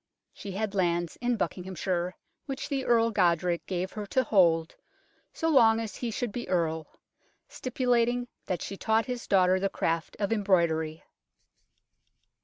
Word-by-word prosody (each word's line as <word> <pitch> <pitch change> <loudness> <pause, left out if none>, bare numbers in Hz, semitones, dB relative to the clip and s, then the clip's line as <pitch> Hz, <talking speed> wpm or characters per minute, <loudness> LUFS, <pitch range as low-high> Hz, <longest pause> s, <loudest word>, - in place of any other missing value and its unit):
She 200 - -8
had 210 +1 -2
lands 175 -3 0
in 245 -1 0
Buckinghamshire 180 -1 -2 0.3
which 270 0 -4
the 275 -3 -1
Earl 230 -1 +3
Godric 175 -3 +2
gave 185 0 -2
her 210 -1 -6
to 260 +5 +2
hold 170 -7 +3 0.6
so 325 - -2
long 230 -7 +5
as 220 -4 -5
he 240 - -3
should 230 0 -3
be 240 - -6
Earl, 160 -3 0 0.6
stipulating 245 -1 0 0.2
that 180 - -2
she 195 - -6
taught 220 +2 +1
his 250 -2 -5
daughter 185 -1 +4
the 195 +1 0
craft 165 -2 -2
of 205 +1 +1
embroidery. 170 -6 +1
195 Hz, 145 wpm, -28 LUFS, 175-230 Hz, 0.6 s, long